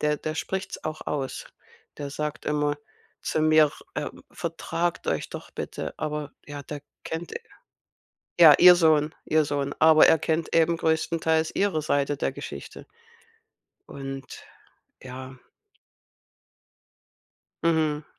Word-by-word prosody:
der 150 0 +1
der 155 +1 -4
spricht's 190 +3 -4
auch 155 0 -5
aus. 135 -3 -3 0.5
Der 140 -1 -5
sagt 150 +1 -4
immer 150 -1 0 0.5
zu 155 - -1
mir, 155 -1 +5 0.2
äh: - - -3 0.2
„Vertragt 170 +1 -3
euch - - -1
doch - - -9
bitte“, - - -5
aber 150 -1 -4
ja, 145 -1 -7
der 145 0 -7 0.2
kennt 160 +2 -5 1.1
ja, 160 -4 +10
ihr 180 0 +10
Sohn 155 -3 +3
ihr 155 0 +3
Sohn, 140 -1 -2
aber 155 0 +7
er 160 - +5
kennt 160 0 -1
eben 165 0 +3
größtenteils 160 0 +1
ihre 195 -6 +1
Seite 145 -1 0
der - - -1
Geschichte - - -9 1.0
und 135 -1 -8 0.6
ja. 130 0 -9 2.3
Mhm, 155 -2 +1
155 Hz, 120 wpm, -26 LUFS, 145-160 Hz, 2.3 s, ja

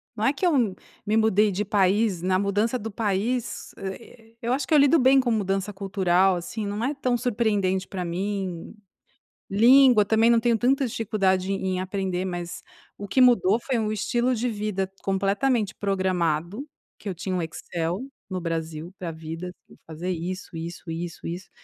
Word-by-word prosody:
não 215 0 -1
é 270 - +4
que 330 - -2
eu 330 - +3
m 225 -7 +2 0.3
me 215 +2 +1
mudei 215 -1 +3
de 200 +3 -2
país 200 -1 +2
na 185 +1 +1
mudança 205 +5 0
do 225 - -5
país, 220 +3 -2
hã, 195 -1 -4
eh, 225 -1 -17
eu 235 +2 0
acho 265 +1 -1
que - - 0
eu - - +7
lido 285 +3 +6
bem 265 -1 +5
com 255 -2 +1
mudança 195 -1 -1
cultural, 190 -1 +2
assim, 185 +5 -5
não 205 +2 -3
é 285 - 0
tão 255 -3 0
surpreendente 205 -6 0
pra 180 -2 -4
mim, 185 0 -3 0.8
língua 240 +1 +6
também 225 +3 +3
não 235 - +5
tenho 235 -1 +2
tanta 265 +4 +2
dificuldade 195 -4 0
em 195 -1 -2
em 185 - -1
aprender, 185 -1 -2
mas 175 -1 -5 0.3
o 205 - -7
que 260 - +2
mudou 230 -5 +5
foi 225 -5 -1
estilo 240 +4 0
de 245 +3 -1
vida 205 -3 -2
completamente 200 +3 0
programado, 185 - -1 0.3
que 205 - -7
eu 190 - -2
tinha 185 +2 -4
um 180 - 0
Excel, 170 +5 -4 0.3
no 185 - -3
Brasil, 165 0 -4
pra 175 -2 -4
vida, 165 +3 -7 0.3
fazer 165 +3 -6
isso, 180 0 -5
isso, 165 +1 -7
isso, 165 +1 -5
isso 175 +2 -6
200 Hz, 175 wpm, -25 LUFS, 185-230 Hz, 0.8 s, eu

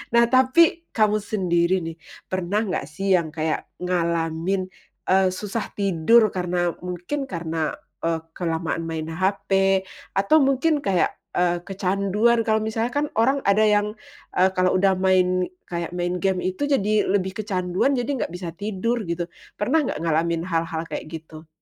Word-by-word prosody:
Nah, 235 - +7
tapi 315 +6 +4
kamu 215 -1 +3
sendiri 185 -3 +1
nih, 165 0 -5 0.4
pernah 185 +3 0
nggak 180 -9 -3
sih 195 +6 -2
yang 165 - -4
kayak 155 0 -1 0.2
ngalamin, 170 +1 0 0.5
eee, 190 0 +5
susah 200 +4 -3
tidur 200 +3 +4
karena 180 -1 0
mungkin 180 +11 -4
karena, 165 -4 -3 0.2
eee, 165 0 0
kelamaan 165 -1 -2
main 160 0 -4
HP 195 +1 +1 0.3
atau 200 +11 +4
mungkin 275 +3 +2
kayak, 195 -9 +1 0.3
eee, 175 0 +2
kecanduan 200 +4 +1
kalau 220 0 +3
misalnya 225 +2 -1
kan 290 +3 0
orang 270 +5 +3
ada 200 +2 +4
yang, 210 0 +2 0.4
eee, 185 +1 +5
kalau 185 0 +2
udah 195 0 +3
main, 185 -1 +3 0.2
kayak 170 0 -4
main 175 0 -1
gim 185 0 0
itu 185 +10 -1
jadi 215 -7 +2
lebih 190 -1 0
kecanduan, 190 +4 0
jadi 245 -1 -1
nggak - - -5
bisa 175 -1 -5
tidur 215 +4 -2
gitu, 170 0 -3 0.3
pernah 285 +8 +2
nggak - - -3
ngalamin 165 0 +1
hal-hal 165 -2 -2
kayak - - -5
gitu? 160 0 -10
185 Hz, 150 wpm, -23 LUFS, 170-215 Hz, 0.5 s, Nah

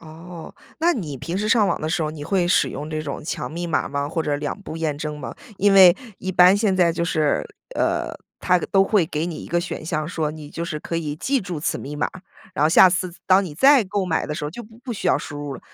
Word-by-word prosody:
哦， 165 +1 -11 0.3
那 345 +1 +4
你 155 - -4
平 165 +9 -4
时 215 +1 -1
上 220 -3 +4
网 170 - -1
的 155 - -2
时 165 +1 0
候 155 - -1
你 150 -2 -8
会 180 -1 +1
使 - - +3
用 150 +2 -6
这 155 - -2
种 145 -2 -5
强 - - -4
密 170 +2 -4
码 165 - 0
吗？ 140 0 -2
或 165 +1 -2
者 145 -1 -1
2 150 +7 -4
步 160 - -7
验 155 -3 -2
证 150 0 -4
吗？ 130 - -7 0.2
因 200 +1 +3
为 185 -2 +8 0.2
一 190 - -4
般 180 +2 +6
现 205 -3 +1
在 175 -2 +4
就 170 +1 -1
是 155 -3 0 0.3
呃， - - 0 0.3
它 180 0 +3
都 195 +2 +2
会 195 -4 +2
给 155 -1 -2
你 170 -3 -5
一 - - -8
个 175 0 0
选 175 -2 -6
项 155 -2 -2
说， 160 -3 -2
你 150 -2 -10
就 165 - -4
是 155 -3 -4
可 165 - -4
以 155 -3 -3
记 260 - 0
住 180 -5 -5
此 - - -1
密 145 +2 -7
码， 150 - -1 0.5
然 145 - +2
后 155 - +5
下 180 +2 +7
次 180 -1 -1
当 190 +1 +5
你 155 -5 -7
再 270 - +6
购 195 0 -2
买 165 -3 -1
的 150 - -3
时 155 - -4
候 150 - -3
就 240 +9 -8
不 220 +1 -17
不 250 -1 -6
需 210 - -4
要 - - +4
输 145 - -7
入 145 -2 -5
了。 - - -10
170 Hz, 285 characters per minute, -22 LUFS, 150-190 Hz, 0.5 s, 为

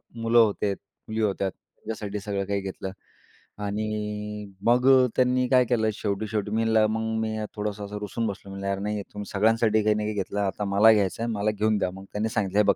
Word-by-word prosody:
मुलं 115 0 +1
होते, 105 -2 +3
मुली 110 +3 -7
होत्या. 100 -2 0
त्यांच्यासाठी 105 +1 -7
सगळं 100 -1 -2
काही 100 0 -1
घेतलं. 95 0 -5 0.7
आणि 105 0 -3 0.2
मग 125 +2 +4 0.3
त्यांनी 125 0 +3
काय 125 -1 +5
केलं 110 -2 +1
शेवटी-शेवटी 105 0 -2
मी 110 +1 +1
म्हणलं, 110 -1 +4
मग 110 0 -1
मी 110 0 -2 0.2
थोडंसं 105 -1 -3
असं 105 +1 -6
रुसून 110 +3 -2
बसलो. 100 -1 -6
म्हणलं 100 0 -5
"यार 100 0 -1
नाही 105 +1 -2
तुम्ही 105 0 -5
सगळ्यांसाठी 110 +1 +3
काही 105 0 +3
ना 105 - -1
काही 105 0 -2
घेतलं 100 +1 -2
आता 100 +1 -1
मला 100 +3 +6
घ्यायचं 105 +1 0
आहे 115 - -1
मला 105 0 +1
घेऊन 105 0 +1
द्या 90 -2 0
मग." 95 +1 -10
त्यांनी 105 +2 -1
सांगितलं 100 -3 -1
"हे - - +6
बघ." - - -2
105 Hz, 200 wpm, -26 LUFS, 100-110 Hz, 0.7 s, मला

